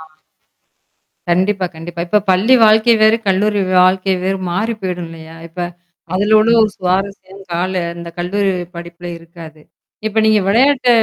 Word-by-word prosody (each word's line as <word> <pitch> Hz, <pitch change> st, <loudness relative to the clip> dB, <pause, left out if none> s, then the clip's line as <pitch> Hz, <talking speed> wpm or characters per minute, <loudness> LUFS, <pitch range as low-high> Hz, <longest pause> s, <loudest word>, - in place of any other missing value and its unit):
ஆ. -, -, -11 dB, 1.3 s
கண்டிப்பா, 190 Hz, +2 st, +1 dB
கண்டிப்பா. 170 Hz, +1 st, -7 dB
இப்ப 210 Hz, +3 st, +2 dB
பள்ளி 205 Hz, +8 st, +3 dB
வாழ்க்கை 220 Hz, +2 st, +5 dB
வேறு, 220 Hz, +1 st, +5 dB
கல்லூரி 205 Hz, +2 st, +1 dB, 0.2 s
வாழ்க்கை 190 Hz, +1 st, +2 dB
வேறு 195 Hz, +1 st, -1 dB
மாறி 220 Hz, +6 st, -1 dB
போயிடும் 180 Hz, -2 st, -4 dB
இல்லயா! 160 Hz, 0 st, -12 dB
இப்ப 170 Hz, +2 st, -12 dB, 0.5 s
அதுல 205 Hz, +3 st, +2 dB
உள்ள 230 Hz, -, +2 dB
ஒரு 215 Hz, -, +1 dB
சுவாரஸ்யம் 195 Hz, +1 st, -3 dB
கால 180 Hz, +2 st, -1 dB, 0.2 s
அந்த 170 Hz, 0 st, -8 dB
கல்லூரி 195 Hz, +3 st, 0 dB, 0.2 s
படிப்பில 170 Hz, +1 st, -9 dB
இருக்காது. 165 Hz, -2 st, -13 dB, 0.5 s
இப்ப 215 Hz, +1 st, 0 dB
நீங்க 215 Hz, -1 st, +4 dB
விளையாட்ட 255 Hz, +5 st, +3 dB
190 Hz, 140 wpm, -16 LUFS, 175-210 Hz, 1.3 s, வாழ்க்கை